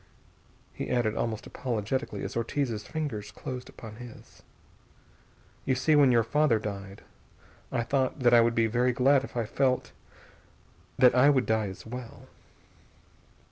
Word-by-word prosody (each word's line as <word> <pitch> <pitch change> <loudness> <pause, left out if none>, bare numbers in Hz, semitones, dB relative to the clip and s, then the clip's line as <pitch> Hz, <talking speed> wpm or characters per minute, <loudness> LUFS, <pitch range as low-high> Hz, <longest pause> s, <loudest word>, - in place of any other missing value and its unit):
He - - -5
added 120 -3 +1
almost 110 -2 -3
apologetically 125 +2 -3
as - - -5
Ortiz's 115 -2 -2
fingers 145 -10 -4
closed 125 -3 -7
upon 110 -2 -11
his: 120 -1 -13 1.2
"You 130 - +1
see, 150 +5 +2
when 140 -3 +6
your 115 -1 +4
father 145 +1 +2
died 100 -2 -7 0.7
I 120 -2 0
thought 130 +2 -1
that 120 -1 +4
I 120 - +8
would 115 0 +2
be 115 - +3
very 120 +3 +1
glad 135 +2 +3
if 135 - -8
I 115 - 0
felt 130 +3 0 1.1
that 125 -1 +6
I 130 +3 +5
would 130 -3 +3
die 110 -1 +1
as 95 - -9
well. 120 +1 -9
120 Hz, 145 wpm, -28 LUFS, 110-130 Hz, 1.2 s, I